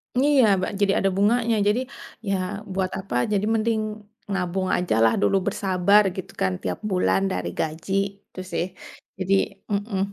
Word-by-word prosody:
Iya, 275 Hz, 0 st, +4 dB, 0.2 s
ba -, -, -1 dB
jadi 200 Hz, -1 st, +4 dB
ada 195 Hz, -, +2 dB
bunganya. 230 Hz, +3 st, +3 dB
Jadi, 215 Hz, +4 st, +3 dB, 0.5 s
ya 195 Hz, -, +2 dB, 0.4 s
buat 190 Hz, -1 st, -1 dB
apa? 190 Hz, -9 st, -6 dB, 0.2 s
Jadi 205 Hz, 0 st, +1 dB
mending 220 Hz, 0 st, +1 dB, 0.5 s
nabung 185 Hz, 0 st, -1 dB
aja 180 Hz, -10 st, 0 dB
lah 110 Hz, -, +5 dB
dulu, 100 Hz, -, +3 dB
bersabar 200 Hz, +1 st, +3 dB
gitu 190 Hz, 0 st, -6 dB
kan. 95 Hz, -, +2 dB
Tiap 90 Hz, -1 st, -3 dB
bulan 95 Hz, -, +2 dB
dari 90 Hz, -1 st, -2 dB
gaji. 160 Hz, +5 st, -3 dB, 0.3 s
Itu -, -, -11 dB
sih. 170 Hz, -, 0 dB, 0.5 s
Jadi 190 Hz, +1 st, 0 dB, 0.4 s
mhm. 200 Hz, -1 st, -1 dB
195 Hz, 155 wpm, -24 LUFS, 180-210 Hz, 0.5 s, lah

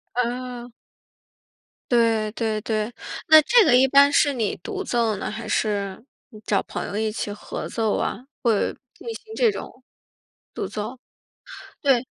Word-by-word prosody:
啊。 245 Hz, 0 st, -3 dB, 1.2 s
对， 225 Hz, -3 st, +3 dB
对， 220 Hz, -2 st, -1 dB
对。 215 Hz, +1 st, -2 dB, 0.4 s
那 315 Hz, 0 st, +10 dB
这 470 Hz, +7 st, +5 dB
个 245 Hz, -, +5 dB
一 260 Hz, +1 st, +6 dB
般 280 Hz, +1 st, +6 dB
是 290 Hz, -, +4 dB
你 230 Hz, -6 st, -1 dB
独 395 Hz, -3 st, -5 dB
奏 235 Hz, -, 0 dB
呢， 195 Hz, +1 st, -4 dB
还 220 Hz, +2 st, -6 dB
是 200 Hz, -3 st, -1 dB, 0.5 s
找 200 Hz, -, +2 dB
朋 -, -, -5 dB
友 -, -, -6 dB
一 215 Hz, +1 st, 0 dB
起 210 Hz, -1 st, -4 dB
合 205 Hz, -, -6 dB
奏 220 Hz, -2 st, 0 dB
啊？ 210 Hz, -, -2 dB, 0.2 s
会 225 Hz, -5 st, +2 dB, 0.2 s
进 -, -, -14 dB
行 445 Hz, 0 st, -11 dB
这 470 Hz, -3 st, +3 dB
种 -, -, -6 dB, 0.9 s
独 -, -, -3 dB
奏？ 215 Hz, +4 st, -5 dB, 0.9 s
对。 265 Hz, -4 st, +3 dB
235 Hz, 160 characters per minute, -23 LUFS, 215-265 Hz, 1.2 s, 那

